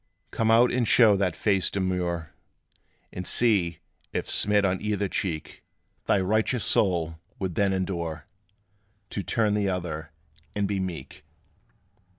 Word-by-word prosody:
Come 110 Hz, -1 st, 0 dB
out, 115 Hz, +2 st, +5 dB
and 120 Hz, -2 st, 0 dB
show 110 Hz, -4 st, +6 dB
that 95 Hz, -3 st, 0 dB
face 95 Hz, -3 st, +1 dB
demure; 90 Hz, -4 st, -2 dB, 0.8 s
And 90 Hz, 0 st, -5 dB
see, 100 Hz, -9 st, +3 dB, 0.3 s
if, -, -, -3 dB
smit 105 Hz, 0 st, +3 dB
on 95 Hz, -1 st, 0 dB
either 105 Hz, -1 st, -1 dB
cheek, 85 Hz, -4 st, -4 dB, 0.4 s
Thy 100 Hz, -, +3 dB
righteous 110 Hz, +5 st, 0 dB
soul 85 Hz, -5 st, +1 dB, 0.2 s
would 95 Hz, -3 st, -3 dB
then 100 Hz, +4 st, +1 dB
endure 85 Hz, -5 st, -3 dB, 0.9 s
To 100 Hz, -, -3 dB
turn 105 Hz, +1 st, +1 dB
the 105 Hz, -2 st, +1 dB
other, 80 Hz, -4 st, -4 dB, 0.5 s
and 100 Hz, -1 st, 0 dB
be 100 Hz, -1 st, -2 dB
meek. 85 Hz, -7 st, -6 dB
95 Hz, 135 wpm, -26 LUFS, 85-105 Hz, 0.9 s, show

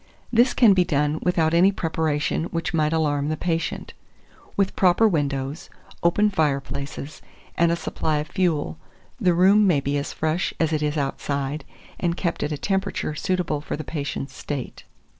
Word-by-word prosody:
This 240 Hz, +2 st, +4 dB
can 230 Hz, -5 st, +6 dB
be 185 Hz, -1 st, +4 dB
done 150 Hz, -1 st, 0 dB
without 165 Hz, -3 st, +1 dB
any 180 Hz, +4 st, +5 dB
preparation 160 Hz, -3 st, -1 dB
which 165 Hz, 0 st, -3 dB
might 155 Hz, -2 st, +2 dB
alarm 150 Hz, -3 st, +1 dB
the 155 Hz, -, -1 dB
patient; 165 Hz, 0 st, -2 dB, 0.6 s
with 195 Hz, -1 st, +1 dB
proper 190 Hz, +4 st, +4 dB
windows, 145 Hz, -4 st, -2 dB, 0.3 s
open 210 Hz, +5 st, +3 dB
fireplaces, 140 Hz, -3 st, -2 dB, 0.3 s
and 170 Hz, 0 st, +3 dB
a -, -, +2 dB
supply 155 Hz, -2 st, -2 dB
of 150 Hz, -, -2 dB
fuel, 155 Hz, -, -1 dB, 0.4 s
the 180 Hz, -2 st, +3 dB
room 195 Hz, +4 st, +5 dB
may 165 Hz, -6 st, +4 dB
be 140 Hz, +1 st, -1 dB
as 140 Hz, -, -4 dB
fresh 160 Hz, +3 st, -1 dB
as 160 Hz, -1 st, +1 dB
it 155 Hz, -, 0 dB
is 150 Hz, 0 st, -1 dB
outside, 140 Hz, +1 st, -2 dB, 0.3 s
and 170 Hz, -1 st, 0 dB
kept 170 Hz, -3 st, -2 dB
at 150 Hz, -, -1 dB
a 150 Hz, -, -2 dB
temperature 195 Hz, -2 st, -1 dB
suitable 165 Hz, -1 st, -1 dB
for 150 Hz, -, -4 dB
the 155 Hz, -, -5 dB
patient's 140 Hz, -3 st, -4 dB
state. 140 Hz, -4 st, -6 dB
160 Hz, 165 wpm, -24 LUFS, 145-180 Hz, 0.6 s, can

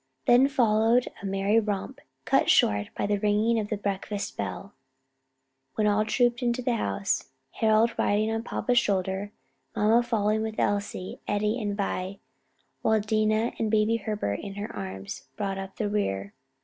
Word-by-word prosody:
Then 245 Hz, +3 st, +6 dB
followed 235 Hz, -2 st, +3 dB
a 200 Hz, -, -4 dB
merry 195 Hz, +3 st, +2 dB
romp, 205 Hz, -3 st, -3 dB, 0.3 s
cut -, -, +3 dB
short 100 Hz, 0 st, +4 dB
by -, -, 0 dB
the 205 Hz, 0 st, 0 dB
ringing 215 Hz, +3 st, +2 dB
of 210 Hz, -1 st, -3 dB
the 215 Hz, -, -1 dB
breakfast 200 Hz, 0 st, -3 dB
bell, 200 Hz, +1 st, -5 dB, 1.0 s
when 215 Hz, -, +1 dB
all 210 Hz, +1 st, +3 dB
trooped 240 Hz, +2 st, +1 dB
into 245 Hz, 0 st, 0 dB
the 240 Hz, -1 st, +1 dB
house, 100 Hz, -, -1 dB, 0.2 s
Harold 220 Hz, +1 st, +3 dB
riding 215 Hz, +2 st, +2 dB
on 225 Hz, 0 st, -1 dB
papa's 245 Hz, +1 st, +1 dB
shoulder, 195 Hz, -1 st, -1 dB, 0.4 s
mamma 220 Hz, +3 st, +4 dB
following 220 Hz, -2 st, 0 dB
with 220 Hz, 0 st, -4 dB
Elsie, 200 Hz, -2 st, -2 dB
Eddie 210 Hz, +3 st, 0 dB
and 205 Hz, -1 st, -2 dB
Vi; 195 Hz, -1 st, -2 dB, 0.6 s
while 220 Hz, 0 st, +3 dB
Dinah, 215 Hz, +2 st, +1 dB
with 220 Hz, -, 0 dB
Baby 220 Hz, +1 st, +2 dB
Herbert 205 Hz, -, -2 dB
in 195 Hz, -1 st, -7 dB
her 205 Hz, +1 st, -6 dB
arms; 95 Hz, 0 st, -6 dB
brought 195 Hz, -2 st, -2 dB
up 195 Hz, 0 st, -7 dB
the 215 Hz, -, -1 dB
rear. 100 Hz, -, -2 dB
210 Hz, 160 wpm, -27 LUFS, 200-225 Hz, 1.0 s, Then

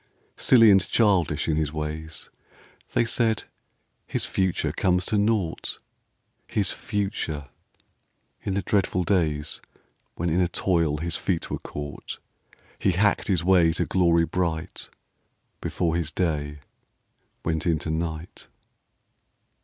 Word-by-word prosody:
Silly 115 Hz, -4 st, +6 dB
and 95 Hz, -1 st, +6 dB
childish 90 Hz, -9 st, +2 dB
in 80 Hz, -2 st, +1 dB
his 75 Hz, -2 st, 0 dB
ways; 80 Hz, +1 st, -5 dB, 0.6 s
They 120 Hz, -, +3 dB
said: 115 Hz, -1 st, +2 dB, 0.3 s
" -, -, -47 dB
His -, -, -1 dB
future 95 Hz, -2 st, 0 dB
comes 90 Hz, -1 st, +1 dB
to 110 Hz, -, +1 dB
naught." 100 Hz, -5 st, 0 dB, 0.7 s
His 100 Hz, -3 st, 0 dB
future 100 Hz, -8 st, -2 dB
I 70 Hz, -, -20 dB, 1.0 s
In 95 Hz, -, -1 dB
the 100 Hz, -, 0 dB
dreadful 95 Hz, -1 st, +1 dB
days 80 Hz, -6 st, 0 dB, 0.5 s
When 85 Hz, 0 st, -1 dB
in 90 Hz, +3 st, +2 dB
a 90 Hz, -, +3 dB
toil 85 Hz, -4 st, +1 dB
his 85 Hz, +2 st, 0 dB
feet 90 Hz, -4 st, -2 dB
were -, -, -2 dB
caught 75 Hz, 0 st, -7 dB, 0.6 s
He 95 Hz, -, +2 dB
hacked 100 Hz, +4 st, +2 dB
his 90 Hz, -4 st, +1 dB
way 85 Hz, -3 st, +5 dB
to -, -, 0 dB
glory 85 Hz, -3 st, +3 dB
bright 85 Hz, -1 st, -3 dB, 0.7 s
Before 85 Hz, -2 st, -1 dB
his 85 Hz, -3 st, -1 dB
day 75 Hz, -3 st, -2 dB, 0.8 s
went 80 Hz, -1 st, -1 dB
down 85 Hz, -3 st, +2 dB
in 80 Hz, 0 st, 0 dB
night. 80 Hz, 0 st, -6 dB
85 Hz, 130 wpm, -25 LUFS, 80-95 Hz, 1.0 s, Silly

